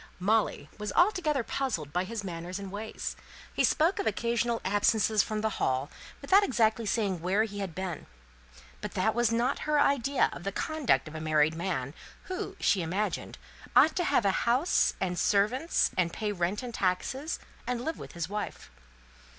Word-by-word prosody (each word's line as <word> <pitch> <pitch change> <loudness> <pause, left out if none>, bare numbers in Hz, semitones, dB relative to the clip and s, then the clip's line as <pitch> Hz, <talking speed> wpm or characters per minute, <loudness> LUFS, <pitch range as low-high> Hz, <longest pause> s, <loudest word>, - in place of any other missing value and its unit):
Molly 215 +4 +1
was 210 -1 -3
altogether 345 - +2
puzzled 195 - -3
by 180 +1 0
his 225 +1 -5
manners 175 0 -5
and 195 -2 -7
ways. 215 +2 -5 0.4
He - - +1
spoke 330 +5 +3
of - - -1
occasional 235 +2 0
absences 205 +2 +3
from 215 0 -3
the 220 0 0
Hall, 130 +3 0 0.3
without 390 +8 +5
exactly 225 - +1
saying 195 -5 0
where 190 +5 +2
he 205 -2 -5
had 190 -5 -4
been. 185 -4 -5 0.7
But - - -6
that 215 +4 +2
was 240 -1 +2
not 235 +3 +1
her 300 -1 +4
idea 280 -1 +2
of - - -9
the 195 - -2
conduct 310 - 0
of 155 - -9
a 155 - -5
married 155 0 +3
man; 160 -6 -3 0.3
who, 370 -1 -5
she 195 - +2
imagined, 190 +6 -2 0.4
ought 315 - +6
to 355 - +1
have 230 - +2
a 195 - +4 0.2
house 260 +9 +3
and 180 -2 -1
servants, 225 +11 +2
and 175 -2 +1
pay 210 +3 -2
rent 190 +4 -1
and 245 -1 -6
taxes, 260 - -1 0.3
and 245 -1 -2
live 320 - -3
with - - -9
his 170 -2 -3
wife. 210 +2 -5
210 Hz, 175 wpm, -29 LUFS, 185-245 Hz, 0.7 s, ought